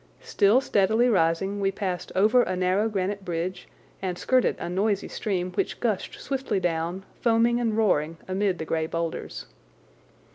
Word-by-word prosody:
Still 210 +5 +3
steadily 220 +1 +2
rising, 190 +1 +1
we 195 -1 +2
passed 185 -3 -4
over 215 +6 +5
a 185 - -1
narrow 185 +4 +1
granite 200 0 -2
bridge 175 +1 -4 0.3
and 185 -2 -3
skirted 255 +4 +2
a - - -5
noisy 195 +3 0
stream 185 -3 -2
which - - -2
gushed 220 -5 -2
swiftly 265 -7 -2
down, 175 +2 -2 0.2
foaming 235 0 +3
and 225 -3 0
roaring 165 -7 +1
amid 190 0 0
the 160 - -5
grey 160 0 -1
boulders. 165 0 -4
195 Hz, 150 wpm, -26 LUFS, 180-220 Hz, 0.3 s, over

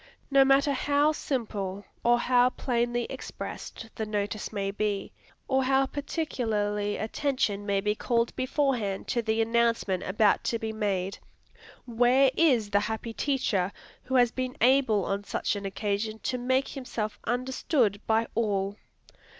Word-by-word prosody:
No 275 0 +7
matter 275 +1 +4
how 285 +3 +2
simple, 205 -9 -3 0.2
or 240 0 +5
how 245 +1 +4
plainly 240 -1 -1
expressed, 225 - -7
the 220 - -3
notice 210 0 -3
may 200 -2 -2
be, 205 0 -2 0.4
or 265 0 +2
how 270 +1 +3
particularly 220 -9 -2
attention 215 -3 -1
may 200 -1 +1
be 210 +1 +1
called 235 +2 0
beforehand 255 -7 -1
to 240 - +1
the 225 0 +1
announcement 230 -5 +1
about 205 +2 +2
to 230 - 0
be 220 -1 -4
made, 200 -3 -2 0.7
where 245 +3 +4
is 245 -11 +3
the 205 - +4
happy 220 +2 -4
teacher 220 -9 0 0.3
who 260 - -2
has 245 -2 +5
been 255 0 -4
able 245 -6 +4
on 200 +1 -2
such 205 - -1
an 200 -1 -4
occasion 205 +2 -2
to 250 -1 -1
make 260 +2 +1
himself 235 -6 -4
understood 245 - 0
by 225 +1 +3
all? 200 -3 0
230 Hz, 140 wpm, -28 LUFS, 205-260 Hz, 0.7 s, No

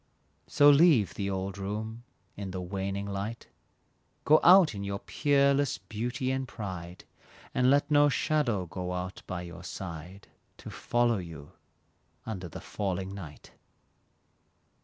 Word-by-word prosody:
So 145 - +5
leave 140 - +5
the 100 -1 -3
old 95 0 -3
room 110 +4 -5 0.3
in 100 -1 -6
the 95 0 -5
waning 95 +2 -3
light, 100 +3 -5 0.8
Go 155 +1 +6
out 180 -4 +7
in 100 -1 -5
your 100 0 -3
peerless 140 +3 +2
beauty 125 +4 -3
and 130 0 -2
pride, 90 -6 -7 0.5
And 125 0 +3
let 145 +2 +3
no 145 0 +6
shadow 135 - 0
go 90 +2 -5
out 90 +1 -5
by 90 -2 -4
your 85 +1 -10
side 90 +1 -8 0.3
To - - -9
follow 120 -2 +1
you 80 -5 -9 0.7
under 95 -6 -5
the - - -9
falling 95 -1 -3
night. 85 -7 -10
100 Hz, 135 wpm, -29 LUFS, 95-130 Hz, 0.8 s, out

